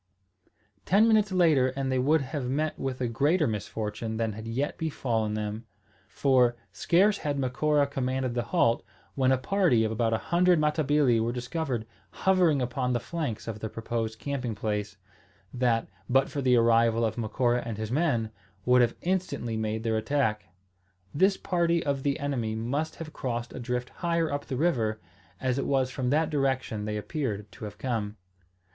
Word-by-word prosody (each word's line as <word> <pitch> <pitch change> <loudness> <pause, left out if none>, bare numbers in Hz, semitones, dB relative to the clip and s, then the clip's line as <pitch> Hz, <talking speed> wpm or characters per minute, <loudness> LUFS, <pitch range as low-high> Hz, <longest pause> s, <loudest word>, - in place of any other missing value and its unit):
Ten 205 +5 +4
minutes 215 -3 +3
later 160 -8 +4
and 135 -1 -1
they 130 - +1
would 150 +4 +3
have 135 -1 -4
met 155 +4 -1
with 130 -1 -3
a 125 - +1
greater 145 +8 +2
misfortune 110 0 -3
than 110 -1 -1
had 110 +2 -8
yet 130 +6 -2
befallen 115 -9 -1
them; 110 +2 -4 0.4
for, 125 -3 +3 0.2
scarce 195 +4 +3
had 145 -2 -2
Macora 145 +3 +2
commanded 130 -2 -2
the 120 - 0
halt, 120 -7 +2 0.3
when 130 -1 +2
a 130 - +4
party 130 - +2
of 110 - 0
about 115 0 0
a 110 - +2 0.2
hundred 180 0 +5
Matabili 150 -5 +2
were 115 +1 0
discovered 125 -1 -3 0.4
hovering 175 -8 +4
upon 125 +1 -1
the 120 - +1
flanks 140 -4 -4
of 110 -2 -4
the 110 - -4
proposed 115 0 -3
camping 125 -1 -3
place, 105 -1 -3 0.6
that, 120 -3 +1 0.2
but 135 +2 +3
for 145 -1 -2
the 130 -2 +4
arrival 115 0 +4
of 110 - -1
Macora 120 +2 0
and 115 -3 -5
his 110 0 -4
men, 125 -7 +1 0.3
would 125 0 +5
have 120 - +2
instantly 180 -11 -1
made 110 0 -2
their 110 -1 +1
attack. 110 -3 0 0.7
This 190 +6 +3
party 170 -2 +1
of 140 -2 0
the 140 0 0
enemy 125 -6 -2
must 140 +8 -2
have 155 -2 -8
crossed 120 -2 -4
a - - -6
drift 125 +1 -3
higher 170 -2 -1
up 145 - -4
the 130 - -3
river, 115 -9 +1 0.4
as 130 0 0
it - - -2
was 135 -2 +1
from 130 -2 -2
that 155 +3 +2
direction 130 -7 -1
they 105 0 -2
appeared 105 -2 -4
to 110 - -9
have 105 - -8
come. 110 -5 -3
125 Hz, 175 wpm, -28 LUFS, 115-145 Hz, 0.7 s, hundred